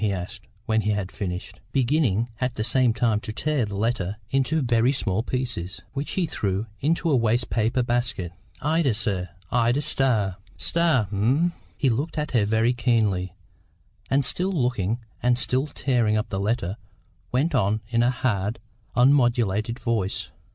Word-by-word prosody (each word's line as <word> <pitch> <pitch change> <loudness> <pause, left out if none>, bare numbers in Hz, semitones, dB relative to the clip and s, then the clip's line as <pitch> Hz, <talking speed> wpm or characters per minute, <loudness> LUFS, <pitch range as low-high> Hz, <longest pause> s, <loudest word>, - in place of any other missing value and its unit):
he 105 - +2
asked, 95 +3 -6 0.2
when 110 0 +2
he 105 - -1
had 100 -3 -1
finished, 90 -2 -5
beginning, 125 -5 +2
at 125 -1 -1
the 110 - -1
same 125 +1 +3
time, 110 -2 +1
to 110 - -6
tear 145 +1 0
the 105 -1 -6
letter 105 -2 -1
into 135 +4 +2
very 120 +1 +3
small 110 -7 0
pieces, 120 -8 -3
which 140 +2 -3
he 185 - +1
threw 105 - -2
into 165 +4 +1
a 150 - +4
waste 120 0 +1
paper 115 +3 +1
basket. 120 -7 -1 0.3
"Ida, 150 -5 +2
sir, 95 -5 -2 0.2
Ida 120 +2 +3
Starr." 110 -10 +1 0.2
"Starr, 165 - +2
eh?" 130 - +2 0.3
He 135 -3 +2
looked 145 +8 -2
at 150 0 -1
her 115 -5 +3
very 110 +3 +2
keenly, 105 -7 +1 0.7
and, 135 0 +2
still 185 +8 0
looking, 120 - 0 0.2
and 125 0 +3
still 130 +3 0
tearing 120 -7 +1
up 110 +1 -2
the 95 - -2
letter, 100 -2 -1 0.5
went 140 +7 +1
on 110 -3 +2
in 115 -1 +2
a 120 - +4
hard, 110 -4 -1 0.4
unmodulated 120 -4 +3
voice. 100 -7 -1
120 Hz, 160 wpm, -25 LUFS, 105-130 Hz, 0.7 s, a